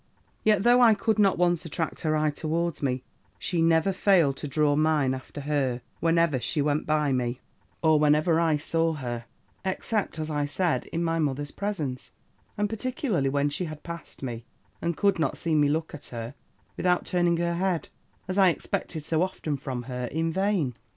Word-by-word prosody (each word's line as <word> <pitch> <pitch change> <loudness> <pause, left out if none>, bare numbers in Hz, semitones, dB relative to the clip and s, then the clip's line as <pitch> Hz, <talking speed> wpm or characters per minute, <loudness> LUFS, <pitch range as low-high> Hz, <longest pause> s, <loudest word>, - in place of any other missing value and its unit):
"Yet, 210 -3 +3
though 245 +2 +6
I 230 -3 +7
could 215 +1 0
not 195 -2 +4
once 175 -1 +2
attract 165 0 -3
her 155 -1 +1
eye 155 0 +2
towards 165 +2 -2
me, 130 -2 -1 0.3
she 175 -2 -1
never 165 +3 +3
failed 180 -8 +3
to 150 - -5
draw 145 0 +2
mine 150 -3 +2
after 130 +2 -7
her, 135 -4 -1 0.2
whenever 165 -4 +2
she 135 +6 -1
went 145 +1 0
by 150 -2 +2
me, 125 -1 -1 0.4
or 155 -1 +5
wherever 150 +2 +3
I 160 -2 +3
saw 165 +2 0
her, 120 -5 -5 0.4
except, 190 +1 -2
as 155 0 -3
I 145 -1 0
said, 170 +3 0
in 170 - -2
my 165 0 0
mother's 145 -1 -1
presence; 160 -11 -4 0.5
and 210 0 +1
particularly 220 - -1
when 145 +1 +1
she 180 +5 -2
had 155 -2 -8
passed 170 -4 -9
me, 120 -3 -4 0.4
and 170 -2 -1
could 200 -1 +2
not 150 -4 0
see 165 - -1
me 150 -1 +4
look 160 +2 -1
at 150 - -7
her, 115 +1 -6 0.4
without 180 -1 +1
turning 175 -1 +2
her 170 0 0
head, 180 -1 -1 0.4
as 185 +2 -1
I 190 -2 +7
expected 160 -1 -3
so 160 +1 +1
often 180 -5 -2
from 130 -3 -5
her 125 0 -4
in 160 +5 -1
vain. 190 -9 +1
160 Hz, 185 wpm, -27 LUFS, 145-175 Hz, 0.5 s, I